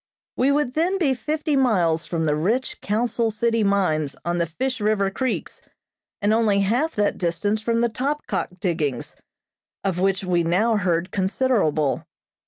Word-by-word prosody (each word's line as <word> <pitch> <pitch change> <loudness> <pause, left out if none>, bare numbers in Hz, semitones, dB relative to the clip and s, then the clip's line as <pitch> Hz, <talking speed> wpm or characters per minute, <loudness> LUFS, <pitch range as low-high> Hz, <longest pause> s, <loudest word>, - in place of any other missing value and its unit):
We 265 +3 +2
would 285 -3 +1
then 345 +6 +1
be 300 -8 +2
fifty 305 +3 -2
miles 180 - +2
from 165 -2 -1
the 150 -1 +2
rich 215 +12 -1
Council 230 +2 0
City 230 +1 +1
mines 170 -8 +1
on 175 0 0
the 170 - +1
Fish 255 +10 -3
River 205 -2 +1
Creeks, 260 +4 -3 0.6
and 210 +1 +3
only 215 -3 +3
half 245 +11 0
that 205 -1 0
distance 205 +5 0
from 230 +1 0
the 235 - +3
Topkok 255 -6 -3
diggings, 160 -8 -2 0.7
of 190 -3 -1
which 195 +1 +1
we 180 -2 +1
now 200 +8 +2
heard 180 -2 0
considerable. 190 - +1
205 Hz, 155 wpm, -23 LUFS, 175-245 Hz, 0.7 s, and